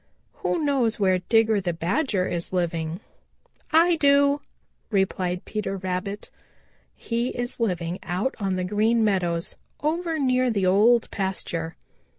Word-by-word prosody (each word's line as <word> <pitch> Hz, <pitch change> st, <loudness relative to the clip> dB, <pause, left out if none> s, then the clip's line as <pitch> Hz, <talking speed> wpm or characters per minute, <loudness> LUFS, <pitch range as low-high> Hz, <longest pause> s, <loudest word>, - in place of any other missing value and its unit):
Who -, -, 0 dB
knows 250 Hz, -6 st, +1 dB
where 185 Hz, -2 st, +3 dB
Digger 220 Hz, +1 st, +3 dB
the 175 Hz, -2 st, -1 dB
Badger 185 Hz, -, 0 dB
is 170 Hz, -1 st, -4 dB
living?" 170 Hz, -2 st, -2 dB, 0.7 s
"I 335 Hz, +2 st, +5 dB
do," 280 Hz, -1 st, +4 dB, 0.5 s
replied 185 Hz, -3 st, 0 dB
Peter 210 Hz, -2 st, -3 dB
Rabbit. 190 Hz, +2 st, -4 dB, 0.6 s
"He 235 Hz, +1 st, -2 dB
is 245 Hz, 0 st, -4 dB
living 180 Hz, -5 st, -1 dB
out 190 Hz, +9 st, -2 dB
on 195 Hz, -2 st, -1 dB
the 185 Hz, -, -1 dB
Green 220 Hz, +4 st, +2 dB
Meadows 175 Hz, -5 st, 0 dB, 0.2 s
over 325 Hz, +2 st, -1 dB
near 255 Hz, -3 st, +2 dB
the 200 Hz, -5 st, 0 dB
Old 220 Hz, +6 st, +4 dB
Pasture." 175 Hz, -4 st, -3 dB
205 Hz, 130 wpm, -25 LUFS, 180-245 Hz, 0.7 s, I